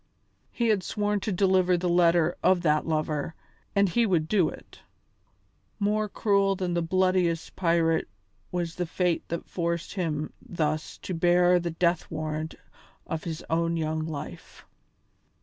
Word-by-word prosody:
He 235 -2 0
had 210 -3 +3
sworn 205 +2 -1
to 205 - -3
deliver 185 -1 +3
the 180 +1 -1
letter 170 -1 +3
of 185 -2 +4
that 155 -2 +2
lover, 155 0 -1 0.4
and 200 0 +4
he 230 +6 +2
would 165 -5 +1
do 185 -3 +3
it. - - -13 1.0
More 210 +1 0
cruel 200 -2 +2
than 180 -2 -2
the 170 - +1
bloodiest 180 -1 +1
pirate 165 - +2 0.4
was 175 -2 -2
the 180 0 -3
fate 175 0 0
that 170 - -4
forced 170 0 -2
him 155 -5 -2
thus 155 -2 -2
to 185 - -4
bear 175 +1 +4
the 170 0 -2
death 170 +1 0
warrant 155 0 -4 0.5
of 160 - -4
his 160 -2 -4
own 165 +1 0
young 155 0 -1
life. 145 - -8
170 Hz, 150 wpm, -27 LUFS, 160-185 Hz, 1.0 s, of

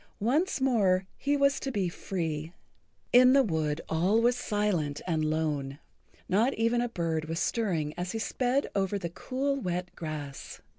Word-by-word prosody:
Once 285 - +1
more 200 -8 +2
he 285 +1 0
was 280 0 +3
to 270 - -3
be 200 -6 0
free. 165 -3 -3 0.6
In 250 +1 +8
the 275 0 +6
wood 160 - -1
all 180 +7 +2
was 240 +1 +3
silent 205 -11 -1
and 160 -3 0
lone. 150 -3 -1 0.5
Not 225 +8 +2
even 230 +2 +2
a 245 - -1
bird 165 -6 -2
was 165 +1 -3
stirring 175 -12 0
as 180 +1 -3
he - - -2
sped 250 +4 0
over 195 0 0
the 170 -3 -5
cool, 275 +8 -2
wet 180 -6 -3
grass. 150 -4 -6
190 Hz, 160 wpm, -29 LUFS, 160-245 Hz, 0.6 s, In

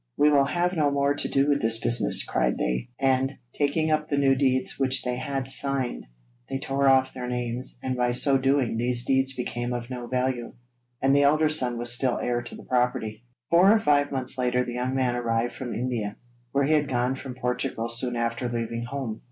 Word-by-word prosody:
'We 150 0 +5
will 140 -2 +4
have 175 +5 0
no 155 -4 +2
more 140 0 +1
to 145 - -2
do 135 +1 +2
with 145 -1 +2
this 115 0 +2
business,' 115 - +2
cried 60 - 0
they, 60 - -2
and, 135 0 +2 0.2
taking 155 +2 0
up 155 0 0
the 145 - 0
new 135 -1 +4
deeds 130 -1 +1
which 130 -1 0
they 125 -1 -1
had 135 0 -4
signed, 135 - -2 0.4
they - - -2
tore 140 0 0
off 130 0 +3
their 125 -1 -5
names, 125 0 -3
and 130 -1 -1
by 125 -1 +1
so 135 +2 +3
doing 135 -3 +1
these 120 +1 0
deeds 135 0 +1
became 120 0 -3
of 120 +1 -5
no 125 -1 -5
value, 125 -1 -2 0.5
and 135 +1 +4
the 140 - +5
elder 155 +2 +4
son 125 -6 +1
was 120 0 -1
still 125 0 0
heir 120 0 -1
to 120 - -9
the - - -11
property. 120 -3 -1 0.3
Four 180 +4 +6
or 220 - +5
five 145 -5 +2
months 130 -1 -2
later 125 0 +1
the 120 - -5
young 125 +2 -2
man 130 -2 +1
arrived 120 0 -1
from 125 -2 -6
India, 115 -4 -3 0.3
where 140 0 +2
he 155 - +2
had 150 -2 +2
gone 125 0 0
from 130 -1 -8
Portugal 125 -2 -2
soon 120 +1 -1
after 115 +1 -2
leaving 115 0 -3
home. 125 -4 -5
130 Hz, 210 wpm, -26 LUFS, 120-140 Hz, 0.5 s, Four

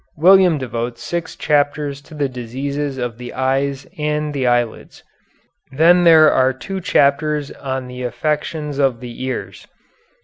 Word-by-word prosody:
William 180 0 +5
devotes 120 -2 -5
six 170 -1 -4
chapters 145 -1 0
to 155 - -14
the 145 -2 0
diseases 135 +3 -4
of 120 -2 -4
the 125 0 -7
eyes 135 +1 -1
and 150 0 -1
the 135 -3 -1
eyelids. 120 -2 -1 0.7
Then 170 +5 +4
there 160 -2 +7
are 130 0 +2
two 190 +9 -6
chapters 150 -1 +1
on 130 -2 -5
affections 150 +3 -3
of 135 -4 +1
the 125 0 -8
ears. 130 -1 -5
140 Hz, 135 wpm, -19 LUFS, 130-150 Hz, 0.7 s, there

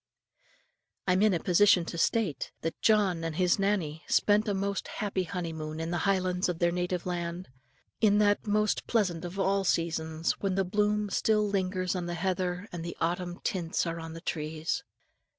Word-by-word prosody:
I 180 - +4
am 185 - +2
in 210 -3 +4
a - - 0
position 180 -1 +4
to 170 - -6
state, 185 - 0
that 165 0 -4
John 200 -6 +3
and 165 -1 -3
his 180 +2 +2
Nannie 180 -6 0
spent 210 +1 +3
a 205 - +1
most 200 0 -2
happy 195 -3 -2
honeymoon 160 -3 -4
in 165 +1 -3
the 175 - 0
Highlands 185 -1 +1
of 175 - -2
their 170 0 +2
native 180 0 -2
land, 175 -1 -4 0.5
in 205 -2 +4
that 205 +1 +2
most 210 +1 +1
pleasant 185 -8 +1
of 175 +2 -6
all 195 0 +2
seasons 160 -2 0
when 195 -2 -1
the 195 0 +1
bloom 210 +1 +1
still 215 0 +2
lingers 185 -2 -1
on 175 -1 -3
the 175 - -3
heather 180 +1 -2
and 170 -2 -5
the 170 - -6
autumn 175 +1 -2
tints 175 -3 -1
are 165 0 -3
on 165 0 -7
the 165 - -8
trees. 155 -1 -2
180 Hz, 185 wpm, -29 LUFS, 170-200 Hz, 0.5 s, I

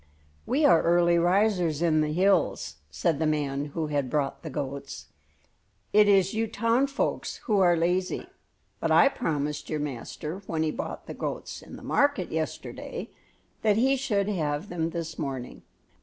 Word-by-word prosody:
"We 290 +3 +2
are 170 - +6
early 170 0 +4
risers 175 -3 +2
in 155 -2 +3
the 150 0 0
hills," 185 - +1
said 75 - 0
the 160 - +1
man 145 -2 -1
who 155 +2 -3
had 145 -3 -1
brought 145 -1 -1
the 160 - -6
goats. 140 0 -5 0.9
"It 210 0 +6
is 195 -2 +4
you 225 +1 0
town 230 +5 +1
folks 275 +1 -2
who 210 -4 +2
are 175 -2 +5
lazy; 180 +3 0 0.5
but - - -1
I 275 - +6
promised 150 - -2
your 155 - -1
master 150 +5 -5
when 160 -1 -1
he 155 - 0
bought - - -5
the - - -7
goats - - -5
in - - -11
the - - -11
market 285 -11 +1
yesterday 160 -1 -4 0.5
that 210 -1 +3
he 265 +4 +4
should 210 -7 0
have 160 -3 -2
them 165 -2 -1
this 165 -1 -5
morning." 135 -5 -5
170 Hz, 165 wpm, -27 LUFS, 150-200 Hz, 0.9 s, are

